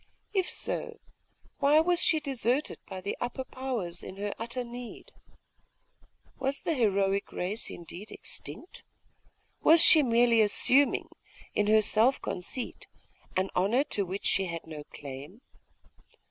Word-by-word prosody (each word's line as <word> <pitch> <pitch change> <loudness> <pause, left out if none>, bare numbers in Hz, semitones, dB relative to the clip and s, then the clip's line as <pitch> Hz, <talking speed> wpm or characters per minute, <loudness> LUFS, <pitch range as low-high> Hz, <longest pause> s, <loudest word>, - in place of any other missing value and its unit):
If 380 -3 +1
so, - - -2 0.6
why 290 +2 +5
was 350 +2 +3
she 315 - +4
deserted 270 -1 -1
by 190 -1 -7
the 200 +2 -3
upper 245 +2 -3
powers 240 -11 -5
in - - -8
her 205 0 -3
utter 235 +2 -3
need? 240 0 -9 1.3
Was 270 +1 -2
the 330 - 0
heroic 200 -6 +1
race 200 +6 -4
indeed 175 +5 -9
extinct? 355 - -10 0.8
Was 325 +2 +6
she 315 - +9
merely 235 -3 +4
assuming, 255 +6 +3 0.4
in 205 - +1
her 215 0 +5
self 230 +6 +3
conceit, 230 +7 -5 0.5
an 190 +1 0
honour 215 +9 +2
to 205 - +1
which 190 +2 -6
she 195 - +2
had 170 -2 -6
no 155 -2 -9
claim? 145 - -10
225 Hz, 130 wpm, -29 LUFS, 190-265 Hz, 1.3 s, she